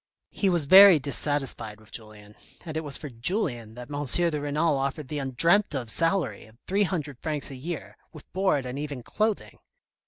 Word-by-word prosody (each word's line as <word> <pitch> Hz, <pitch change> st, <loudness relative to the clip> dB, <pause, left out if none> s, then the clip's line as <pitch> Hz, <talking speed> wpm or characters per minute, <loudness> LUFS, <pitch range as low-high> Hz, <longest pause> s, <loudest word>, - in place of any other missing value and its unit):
He 195 Hz, -, 0 dB
was 170 Hz, -5 st, +1 dB
very 190 Hz, +2 st, +9 dB
dissatisfied 135 Hz, -6 st, -1 dB
with 110 Hz, -, -18 dB
Julien, 105 Hz, -2 st, -9 dB, 0.3 s
and 160 Hz, -2 st, -6 dB
it 160 Hz, -, -2 dB
was 145 Hz, -2 st, -1 dB
for 150 Hz, -, -7 dB
Julien 120 Hz, -, -2 dB
that 125 Hz, +2 st, -10 dB
M. 145 Hz, 0 st, -2 dB
de 155 Hz, +2 st, +1 dB
Renal 150 Hz, +2 st, +1 dB
offered 135 Hz, 0 st, -3 dB
the 150 Hz, -, -3 dB
undreamt 150 Hz, +8 st, +2 dB
of 120 Hz, -4 st, -3 dB
salary 165 Hz, -, -1 dB
of 110 Hz, +1 st, -21 dB
30ofcs. 155 Hz, -7 st, -2 dB
a -, -, -7 dB
year, 155 Hz, +5 st, -6 dB, 0.2 s
with 155 Hz, -, -13 dB
board 185 Hz, -8 st, +1 dB
and 125 Hz, +2 st, -5 dB
even 145 Hz, -4 st, -5 dB
clothing. 215 Hz, -, -2 dB
145 Hz, 175 wpm, -26 LUFS, 125-170 Hz, 0.3 s, very